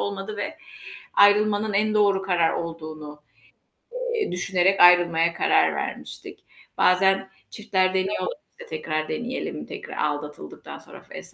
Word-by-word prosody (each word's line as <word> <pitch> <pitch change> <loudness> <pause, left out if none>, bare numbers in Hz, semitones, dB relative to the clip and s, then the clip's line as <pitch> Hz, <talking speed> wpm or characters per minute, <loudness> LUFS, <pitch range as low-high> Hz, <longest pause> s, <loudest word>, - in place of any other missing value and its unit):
olmadı 200 +1 -4
ve 310 +10 -5 0.6
ayrılmanın 210 +1 +4
en 215 +2 +1
doğru 200 -2 +3
karar 175 -4 +1
olduğunu, 155 -3 -7 1.0
eee, 435 - -1
düşünerek 185 +1 +1
ayrılmaya 170 -1 +5
karar - - +2
vermiştik. - - -7 0.4
Bazen 190 +1 +3 0.2
çiftler 190 -4 0
deniyorlar, 190 +2 -1 0.2
işte, 485 0 -13
tekrar 155 - -3
deneyelim 240 +2 -4
tekrar - - -9
aldatıldıktan 150 - -5
sonra - - -14
vs. - - -10
190 Hz, 115 wpm, -24 LUFS, 165-205 Hz, 1.0 s, ayrılmaya